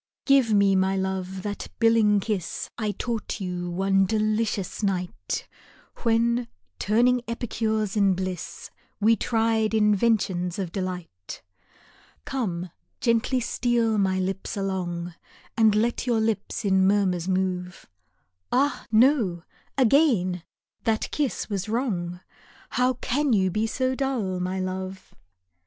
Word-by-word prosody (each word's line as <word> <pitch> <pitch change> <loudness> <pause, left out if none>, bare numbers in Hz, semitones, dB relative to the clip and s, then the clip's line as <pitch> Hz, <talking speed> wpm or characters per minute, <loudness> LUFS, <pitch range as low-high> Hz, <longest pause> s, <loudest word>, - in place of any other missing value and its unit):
GIVE 270 -5 +4
me, 200 -2 +4
my 190 +1 +2
lc" 190 -1 -2
e, - - -5
that 205 +1 -5
billing 225 -3 +4
kiss 195 -4 -3
I 215 -2 -2
taught 225 +1 -3
you 180 -2 -3
one 195 +2 +2
delicious 215 -2 -1
night, 180 - -2 0.5
When, 235 +1 +1 0.3
turning 245 +4 +3
epicures 220 -2 -1
in 200 -3 +3
bliss, 185 -2 -5 0.3
We 220 +2 +5
tried 225 0 +1
inventions 205 -4 +2
of 190 -4 -3
delight. 180 - -6 0.8
Come, 185 -10 -3 0.3
gently 235 +2 +2
steal 230 -2 +1
my 190 -1 +2
lips 190 +2 -3
along, 180 -3 -3 0.4
And 220 -2 +4
let 235 +3 0
your 235 -2 +2
lips 220 0 -1
in 190 -1 +4
murmurs 190 -4 +1
move, 185 -1 -2 0.6
Ah, 280 +3 +1
no! 220 - +3 0.3
again 230 - +3 0.4
that 220 -1 0
kiss 290 -4 -1
was 200 0 -3
wrong, 185 -8 -2 0.5
How 250 +1 +2
can 260 +2 0
you 190 -3 +2
be 215 +4 0
so 255 +3 0
dull, 250 -9 -1
my 185 +1 -2
love 185 0 -5
205 Hz, 120 wpm, -25 LUFS, 185-230 Hz, 0.8 s, We